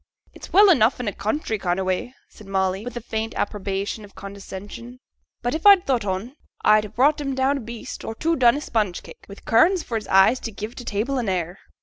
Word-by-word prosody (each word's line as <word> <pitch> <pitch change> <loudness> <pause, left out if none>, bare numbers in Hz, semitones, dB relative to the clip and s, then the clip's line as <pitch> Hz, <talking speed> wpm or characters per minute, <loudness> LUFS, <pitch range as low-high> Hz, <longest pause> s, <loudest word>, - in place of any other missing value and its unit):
'It's - - -12
well 405 +1 +7
enough 240 -5 +3
in 245 - -4
a 205 - -1
country 220 -1 -2
kind 180 -1 -1
o' - - -1
way,' 185 +6 -2 0.2
said 210 - -16
Molly, 190 0 -1
with 245 0 -7
the 240 - -4
faint 220 0 -4
approbation 200 +1 -3
of 200 - -15
condescension. 200 +5 -9 0.4
'But 245 - -1
if 315 - -3
I'd 400 -3 +7
thought 250 -6 0
on, 200 +7 -4 0.3
I'd 215 0 +5
ha' 210 - -12
brought 290 +5 +3
'em 275 -2 -3
down 265 +2 +1
a - - -6
beast 230 0 -8
or 225 - -5
two 330 +7 0
done 245 -4 +4
i' - - -2
sponge 210 -10 -2
cake, - - -14
wi' 200 - -9
currants 335 +11 +4
for 230 - -3
his 210 - -7
eyes 195 +6 +5
to 225 - -6
give 215 +2 -7
t' 250 - -9
table 235 +6 -1
an 230 -5 -2
air.' 180 0 -3
225 Hz, 235 wpm, -23 LUFS, 200-260 Hz, 0.4 s, well